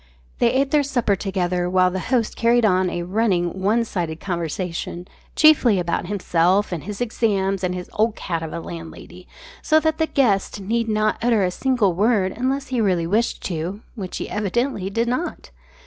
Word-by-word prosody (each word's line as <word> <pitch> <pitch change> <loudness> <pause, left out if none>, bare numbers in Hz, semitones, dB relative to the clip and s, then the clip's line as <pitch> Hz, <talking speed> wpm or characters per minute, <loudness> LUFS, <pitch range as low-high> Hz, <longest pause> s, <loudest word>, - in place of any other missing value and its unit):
They 235 - +4
ate 270 +1 +1
their 300 - +4
supper 245 -7 0
together 180 -2 -1
while 185 0 +3
the 190 - -3
host 245 -4 +1
carried 235 0 +3
on 185 -2 +3
a 175 0 -3
running 185 -2 0
one 220 +4 +2
sided 170 -6 -3
conversation, 175 0 -4 0.3
chiefly 290 -9 +5
about 175 0 -1
himself 185 0 +1
and 170 -3 -4
his 210 +2 -6
exams 195 -5 0
and 180 0 -1
his 180 0 -6
"old 220 +1 +1
cat" 165 -3 -3
of 160 -1 -5
a 170 - -4
landlady, 170 +2 -10 0.3
so 310 - +4
that 315 0 0
the 320 - +2
guest 210 -10 +1
need 225 +3 -1
not 215 0 +1
utter 230 -3 +2
a 180 - +1
single 240 -4 +1
word 200 0 +2
unless 270 +3 -2
he 250 -3 0
really 180 -5 +1
wished 215 +7 0
to 180 +4 -4
which 195 -6 -6
he - - -4
evidently 210 0 -1
did 230 +4 -1
not! 255 +9 -3
200 Hz, 180 wpm, -22 LUFS, 180-235 Hz, 0.3 s, chiefly